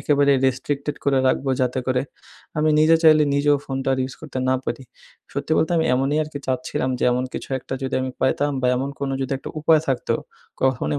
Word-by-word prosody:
একেবারে 140 -1 +3
রেস্ট্রিকটেড 140 +2 -2
করে 140 -1 +3
রাখবো। 135 +1 +1
যাতে 125 0 0
করে 130 0 +1 0.6
আমি 155 +1 +3
নিজে 160 +1 +6
চাইলে 155 -2 +6
নিজেও 145 0 +3
ফোনটা 135 0 -3
আর 130 - -4
ইউজ 130 +1 -5
করতে 155 -4 -6
না 130 - +3
পারি। 120 +3 -4 0.5
সত্যি 140 +2 -3
বলতে 160 - +1
আমি 160 - +2
এমনই 135 +3 +1
আরকি 150 -1 -6
চাচ্ছিলাম 130 0 -1
যে - - 0
এমন 125 +1 0
কিছু - - -6
একটা 130 - -6
যদি 130 0 -2
আমি 130 - -3
পাইতাম 145 +2 +1
বা - - +2
এমন 135 +2 -2
কোনো 140 -1 -2
যদি 135 0 -2
একটা - - -8
উপায় 155 0 +4
থাকতো। 135 -3 0 0.5
কখনোই 95 - +1
135 Hz, 200 wpm, -22 LUFS, 130-145 Hz, 0.6 s, নিজে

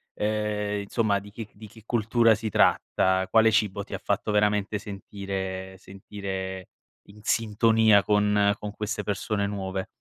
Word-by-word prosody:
ehm, 105 -1 -1
insomma 100 0 0
di 100 +1 -12
chi 110 0 -7
di 110 +1 -12
che 110 +1 -17
cultura 115 0 +3
si 110 0 -4
tratta? 95 -1 +2
Quale 110 +1 +5
cibo 100 -2 +1
ti - - -11
ha - - -2
fatto 100 +1 -1
veramente 105 0 +1
sentire 95 -2 -6
sentire 95 -1 -7 0.4
in 105 +1 -15
sintonia 110 -2 +3
con 105 -1 +3
con 105 0 -6
queste 105 0 -4
persone 100 +1 -2
nuove? 95 -1 -4
105 Hz, 145 wpm, -26 LUFS, 100-105 Hz, 0.4 s, Quale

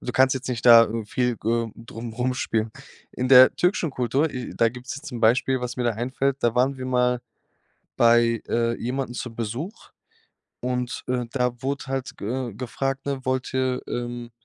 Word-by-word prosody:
Du 125 - -5
kannst 130 0 +4
jetzt 130 0 -5
nicht 120 -3 -3
da 115 -1 +9 0.2
viel 125 0 0
g 110 - -4
äh, 115 -1 0
drum 115 0 -8
rumspielen. 120 -2 -1 0.4
In 125 0 -2
der 130 -1 +8
türkischen 180 -3 +1
Kultur 130 +5 0
äh, 125 -1 -6
da 115 - +4
gibt's 125 +3 -7
ja 140 - -10
zum 120 -7 -7
Beispiel, 125 +3 +3
was 125 0 -4
mir 125 - -1
da 120 - +2
einfällt, 130 +4 -1
da 120 -1 +1
waren 130 +2 +2
wir 130 - -5
mal 125 -1 +1 0.8
bei, 115 -1 +4
äh, 115 0 +1
jemanden 125 +1 -3
zu 120 -1 -5
Besuch 120 - -5 0.7
und, 125 0 -3
äh, 125 -1 -1
da 125 -2 -1
wurde 140 +1 -3
halt, 135 -1 -4
g - - -8
äh, 120 -1 -3
gefragt, 135 +3 -3
ne: 135 -2 -3
„Wollt 130 0 -1
ihr, 130 -1 0
ähm 120 0 -4
125 Hz, 185 wpm, -24 LUFS, 120-130 Hz, 0.8 s, da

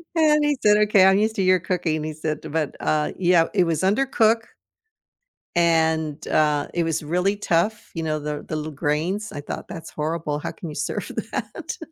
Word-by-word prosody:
And 300 -2 +4
he 290 -2 +1
said, 210 0 +5
"Okay, 210 -2 +5
I'm 190 +1 +5
used 220 +1 +1
to - - +1
your 185 -1 +4
cooking," 165 -3 -1
he 155 - -4
said, 155 0 -3
but, 155 -3 -1
uh, 150 -1 0
yeah, 175 -2 +4
it 190 - +4
was 165 -2 0
undercook 225 +1 +2 1.1
and, 160 -3 +1
uh, 150 -2 +2
it 170 - +1
was 165 -1 -1
really 180 +6 +1
tough, 205 +3 -1
you 165 - -3
know, 155 -1 -1
the 150 0 -4
l - - -9
the - - -5
little 155 0 -4
grains. 160 +9 -2
I 145 - -6
thought - - -6
that's 165 -1 -8
horrible, 155 -1 -2
how - - -4
can 170 - -8
you 150 - -8
serve 150 - -3 0.2
that? - - -5
165 Hz, 195 wpm, -23 LUFS, 155-200 Hz, 1.1 s, said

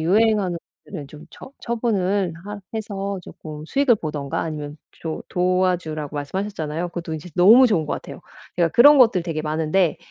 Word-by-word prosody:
유행하는 195 0 +2 0.3
것들은 145 -3 -8
좀 150 0 -12
처 270 - -12
처분을 200 -6 -1
하 205 0 -7
해서 200 -2 -4
쪼끔 155 -2 -10
수익을 275 0 +3
보든가 150 -5 -4
아니면 150 -2 -5 0.2
조 160 -1 -6
도와주라고 180 -5 0
말씀하셨잖아요. 165 +1 -3
그것도 170 -2 -5
인제 160 +3 -8
너무 225 +9 +8
좋은 165 -9 +1
것 - - -1
같아요. - - -9 0.4
제가 170 -2 +3
그런 285 - +7
것들 225 -8 +5
되게 165 -3 -3
많은데 160 +3 +1
180 Hz, 375 characters per minute, -22 LUFS, 155-205 Hz, 0.4 s, 너무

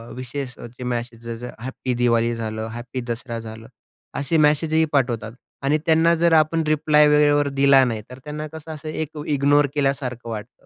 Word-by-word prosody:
विशेष 130 +1 -5
जे 125 +2 -9
message 120 -1 -5 0.2
happy 130 +1 -4
Diwali 115 -1 +2
झालं, 110 -1 -4
हॅपी 120 +2 -6
दसरा 115 0 -4
झालं 110 0 -9 0.5
असे 145 +4 0
मेसेज 155 +1 +3
ही 160 0 +4
पाठवतात, 120 -5 0 0.3
आणि 145 +3 +2
त्यांना 165 +1 +4
जर 170 0 +3
आपण 160 +1 -2
रिप्लाय 150 0 +4
वेळेवर 145 -1 +4
दिला 140 -1 +6
नाही, 110 -3 -2
तर 125 - -10
त्यांना 150 +1 -5
कसं 160 0 -8
असं 155 +1 -7
एक 155 0 -4
इग्नोर 145 0 +3
केल्यासारखं 135 -4 -1
वाटतं. 110 +1 -8
135 Hz, 165 wpm, -22 LUFS, 120-150 Hz, 0.5 s, दिला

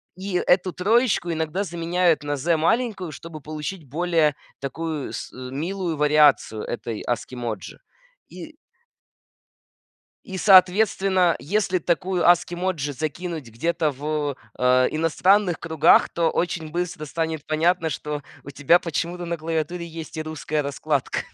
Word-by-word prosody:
и 190 +1 -6
эту 180 0 +2
троечку 215 -2 +2
иногда 160 +4 -1
заменяют 175 -2 +1
на 145 0 -2
"з" 165 +5 +1
маленькую, 195 +1 0
чтобы 155 +1 -9
получить 155 +2 -6
более 160 -1 +1 0.2
такую 155 +1 -4 0.2
милую 160 +7 -4
вариацию 150 -7 +4
этой 115 -2 -5
ASCII 120 +1 -3
emoji. 115 -5 -5 0.5
И - - -10 1.7
и 190 - -6
соответственно, 190 -1 +4
если 185 - 0
такую 180 +2 0
ASCII 175 0 +4
emoji 170 -6 -2
закинуть 155 0 -4
где-то 155 +6 0
в, 145 0 -3 0.2
а, 125 0 +4
иностранных 175 +4 +2
кругах, 160 -2 +4
то 170 -1 0
очень 165 -3 -2
быстро 175 -2 -3
станет 160 0 -3
понятно, 160 +1 +1
что 150 +1 -4 0.2
у - - -8
тебя 145 +5 +4
почему-то 175 +1 -3
на 170 0 -3
клавиатуре 165 +2 -3
есть 165 -1 -8
и 155 - -2
русская 155 -1 -3
раскладка. 140 0 -2
165 Hz, 125 wpm, -23 LUFS, 150-180 Hz, 1.7 s, вариацию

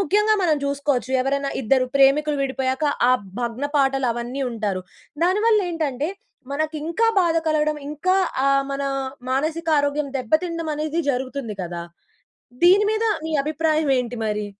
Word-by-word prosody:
ముఖ్యంగా 420 +3 +3
మనం 320 -4 +3
చూసుకోవచ్చు 280 -2 -1
ఎవరైనా 275 +1 -1
ఇద్దరు 255 +3 +3
ప్రేమికులు 285 +2 +4
విడిపోయాక 265 +1 -1 0.3
ఆ - - +6 0.3
భగ్న 240 +3 -3
పాటలు 270 -2 +2
అవన్నీ 240 +3 -4
ఉంటారు. 210 -5 -2 0.4
దానివల్ల 420 +4 +3
ఏంటంటే 300 -3 -2 0.4
మనకి 310 +2 -2
ఇంకా 400 +8 +1
బాధ 335 -2 +2
కలగడం. 305 -1 +1
ఇంకా 370 +6 +1 0.3
ఆహ్, 275 0 +3
మన 275 0 -3 0.5
మానసిక 315 +5 -1
ఆరోగ్యం 285 +1 0
దెబ్బతినడమనేది 310 +3 -1
జరుగుతుంది 255 -3 -4
కదా! 175 0 -5 0.8
దీని 380 +4 +6
మీద 440 +1 0 0.2
మీ 320 - -3
అభిప్రాయం 310 +1 0
ఏంటి 245 0 -3
మరి? 210 -1 -2
285 Hz, 130 wpm, -22 LUFS, 260-320 Hz, 0.8 s, ఆ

